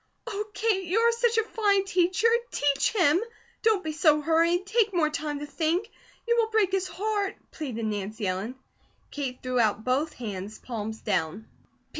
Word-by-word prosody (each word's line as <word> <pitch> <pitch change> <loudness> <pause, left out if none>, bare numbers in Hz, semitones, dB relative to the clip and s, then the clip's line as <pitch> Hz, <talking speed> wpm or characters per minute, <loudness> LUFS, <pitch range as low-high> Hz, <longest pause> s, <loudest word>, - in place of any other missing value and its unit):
"Oh, 420 -3 -3
Kate, 410 -4 +1
you 360 +5 0
are 465 +1 +5
such 465 0 +1
a 450 - +4
fine 410 -3 +1
teacher! 370 +3 +2 0.2
Teach 285 -1 +1
him! 350 -5 +3 0.4
Don't 435 -4 +3
be 315 - -2
so 305 -1 +4
hurried! 335 +4 +2
Take 420 -1 +1
more 310 -3 +2
time 300 -1 -3
to - - -3
think. 330 +8 -1 0.4
You 470 0 +3
will 455 -1 +2
break 430 -4 +2
his 380 -1 0
heart," 410 0 -2 0.2
pleaded 245 -7 -4
Nancy 210 +1 -3
Ellen. 190 +7 -2 0.6
Kate 265 -3 -5
threw 255 -1 0
out 220 -1 +2
both 275 +6 0
hands, 210 -2 -6
palms 220 -2 -5
down. 160 +7 -1
325 Hz, 170 wpm, -27 LUFS, 250-410 Hz, 0.6 s, are